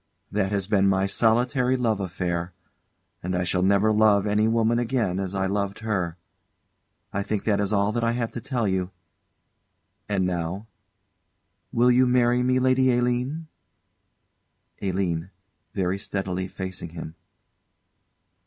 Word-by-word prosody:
That 100 -1 0
has 100 -2 0
been 100 -1 +3
my 95 0 +2
solitary 125 +5 +2
love 115 -4 0
affair; 90 -2 -3 0.7
and 90 +1 -2
I 90 - 0
shall 90 +1 0
never 100 +3 +3
love 105 -2 +4
any 105 +1 +2
woman 115 +1 +2
again 115 -7 0
as 95 0 -3
I 95 0 0
loved 100 +1 -2
her. 90 -6 -1 1.0
I 100 - 0
think 100 0 -2
that 105 -2 +1
is 100 0 0
all 100 0 +2
that 120 +1 -2
I 115 0 +2
have 120 -1 -2
to 120 - -6
tell 120 -3 -1
you. 95 -1 -1 1.2
And 95 -2 +1
now 90 +3 -3 1.1
will 125 +2 +4
you 125 +1 +4
marry 125 0 +3
me, 130 +1 +2
Lady 130 0 +3
Aline? 125 +6 -1 1.4
ALINE. 90 -3 -1 0.5
[_Very 95 0 -1
steadily, 95 -2 -3
facing 95 -2 -6
him. 80 -1 -8
100 Hz, 140 wpm, -25 LUFS, 95-120 Hz, 1.4 s, love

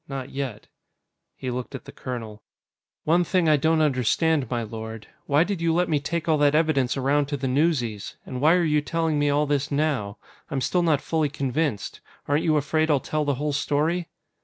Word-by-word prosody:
Not 135 -2 -6
yet." 135 -6 -5 0.7
He 130 - -4
looked 125 +2 -5
at 135 - -8
the - - -10
colonel. 115 -5 -7 0.6
"One 170 +3 +3
thing 180 -1 +1
I 155 - +6
don't 160 +2 +2
understand, 140 +1 +1
my 120 -2 -1
lord. 110 0 -7 0.2
Why 145 +3 +4
did 190 -2 -3
you 165 -1 +2
let 180 +1 +1
me 150 -2 +2
take 165 +3 -3
all 155 -2 +3
that 145 0 +4
evidence 155 -5 +2
around 140 +2 +1
to 145 0 -2
the 135 0 -2
newsies? 125 -7 0
And 125 0 -5
why 160 +4 +5
are 180 - +2
you 150 -2 +2
telling 160 0 -1
me 145 0 +2
all 145 +1 +2
this 145 -1 0
now? 140 -9 -1 0.3
I'm 135 - -1
still 175 +7 +1
not 155 -5 +2
fully 160 -2 0
convinced. 140 -4 -2 0.3
Aren't 145 +2 +1
you 155 -2 +3
afraid 155 +2 +1
I'll 145 -3 +4
tell 155 +2 -2
the 145 -1 +1
whole 145 +2 -2
story?" 160 +5 0
145 Hz, 205 wpm, -25 LUFS, 130-160 Hz, 0.7 s, I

